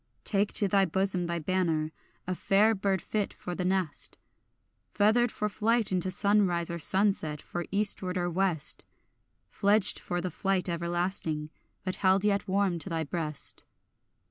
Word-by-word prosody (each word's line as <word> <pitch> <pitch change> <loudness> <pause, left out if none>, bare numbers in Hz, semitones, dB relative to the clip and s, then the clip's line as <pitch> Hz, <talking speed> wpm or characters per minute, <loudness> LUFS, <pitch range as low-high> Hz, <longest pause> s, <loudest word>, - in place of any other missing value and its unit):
Take 200 0 0
to 205 - +1
thy 195 0 +3
bosom 185 0 0
thy 170 0 -2
banner, 165 -2 -1 0.3
a 185 - -2
fair 205 +4 +3
bird 195 -2 -1
fit 210 -2 -2
for 180 - -7
the 180 - -3
nest, 185 -4 -1 0.7
Feathered 220 +3 +2
for 210 - -2
flight 225 +1 +1
into 185 0 0
sunrise 185 -3 +1
or 170 - -5
sunset, 190 -4 +2
for 175 +3 -6
eastward 195 -2 +4
or 175 -1 -1
west, 175 -3 0 0.6
Fledged 205 0 +2
for 175 - -3
the 180 0 -4
flight 190 -2 -1
everlasting, 170 -3 -2 0.3
but 185 -1 -3
held 190 +1 +2
yet 200 -1 0
warm 190 -2 0
to 190 - -5
thy 165 -1 -2
breast. 155 -1 -4
185 Hz, 150 wpm, -28 LUFS, 170-200 Hz, 0.7 s, eastward